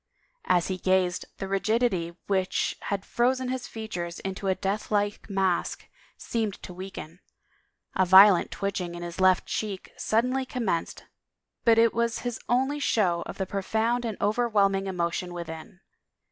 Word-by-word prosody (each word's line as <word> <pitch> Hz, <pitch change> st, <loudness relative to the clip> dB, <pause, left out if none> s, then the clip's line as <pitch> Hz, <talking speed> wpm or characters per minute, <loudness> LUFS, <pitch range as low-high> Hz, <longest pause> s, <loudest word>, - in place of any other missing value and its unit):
As 175 Hz, -2 st, +2 dB
he 185 Hz, -1 st, -3 dB
gazed, 185 Hz, -1 st, +1 dB
the 195 Hz, -, -4 dB
rigidity 195 Hz, -4 st, 0 dB
which 190 Hz, -2 st, 0 dB
had 200 Hz, -1 st, -2 dB
frozen 255 Hz, +1 st, +1 dB
his 255 Hz, -1 st, -3 dB
features 175 Hz, -6 st, -5 dB
into 195 Hz, +1 st, -4 dB
a 190 Hz, -, +2 dB
death 195 Hz, +3 st, -2 dB
like 205 Hz, 0 st, -1 dB
mask, 190 Hz, -3 st, 0 dB, 0.3 s
seemed 220 Hz, -4 st, -2 dB
to 180 Hz, -, -8 dB
weaken; 180 Hz, -2 st, -8 dB, 0.8 s
a 190 Hz, -, +4 dB
violent 190 Hz, 0 st, +8 dB
twitching 185 Hz, -3 st, -3 dB
in 175 Hz, -, -6 dB
his 175 Hz, +2 st, -5 dB
left 185 Hz, -1 st, +4 dB
cheek 205 Hz, -3 st, -4 dB
suddenly 250 Hz, +4 st, +1 dB
commenced 230 Hz, -10 st, -3 dB, 0.6 s
but 230 Hz, -1 st, +6 dB
it 230 Hz, 0 st, +5 dB
was 235 Hz, 0 st, 0 dB
his 245 Hz, -2 st, -3 dB
only 265 Hz, +4 st, +1 dB
show 185 Hz, -10 st, +1 dB
of -, -, -7 dB
the 190 Hz, -, -1 dB
profound 220 Hz, +5 st, 0 dB
and 225 Hz, -4 st, -3 dB
overwhelming 205 Hz, -3 st, +2 dB
emotion 175 Hz, -1 st, -2 dB
within. 170 Hz, +1 st, -8 dB
195 Hz, 145 wpm, -27 LUFS, 185-225 Hz, 0.8 s, violent